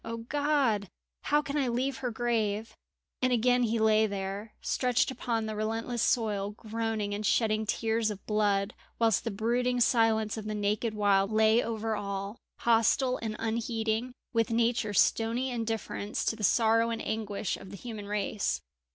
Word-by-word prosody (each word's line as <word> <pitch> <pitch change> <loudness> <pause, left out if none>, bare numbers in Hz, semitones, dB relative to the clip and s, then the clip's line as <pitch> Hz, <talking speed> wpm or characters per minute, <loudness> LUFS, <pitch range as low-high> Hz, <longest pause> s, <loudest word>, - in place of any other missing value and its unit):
O 230 0 -5
God! 265 -4 +1 0.4
how 295 +1 +3
can 280 +1 -3
I 275 -3 +1
leave 255 +3 -1
her 250 - -2
grave?" 220 -2 -1 0.5
And 255 0 +2
again 245 +1 +3
he 230 -1 +1
lay 220 0 +4
there, 200 +2 -5
stretched 250 0 +1
upon 235 -3 -2
the 215 0 -4
relentless 225 +2 -2
soil, 210 -5 +1
groaning 220 -2 -2
and 205 +1 -3
shedding 215 0 +1
tears 225 0 0
of 200 -2 -7
blood, 205 -1 +1 0.2
whilst 225 -2 +2
the - - 0
brooding 245 +4 0
silence 225 -2 +3
of 215 - -6
the 215 0 -3
naked 210 +2 -1
wild 200 -1 +3
lay 220 +2 +4
over 225 -1 -2
all, 200 +1 -4 0.2
hostile 235 +3 +3
and 220 -2 -4
unheeding, 225 +1 -2 0.2
with 230 0 +2
Nature's 230 -2 +1
stony 235 +4 +2
indifference 225 -3 -3
to - - +1
the 215 - -8
sorrow 230 +3 +3
and 230 -1 -3
anguish 210 -3 -2
of 190 - -11
the 200 - -8
human 215 -2 -7
race. 205 - -1
225 Hz, 160 wpm, -29 LUFS, 210-235 Hz, 0.5 s, lay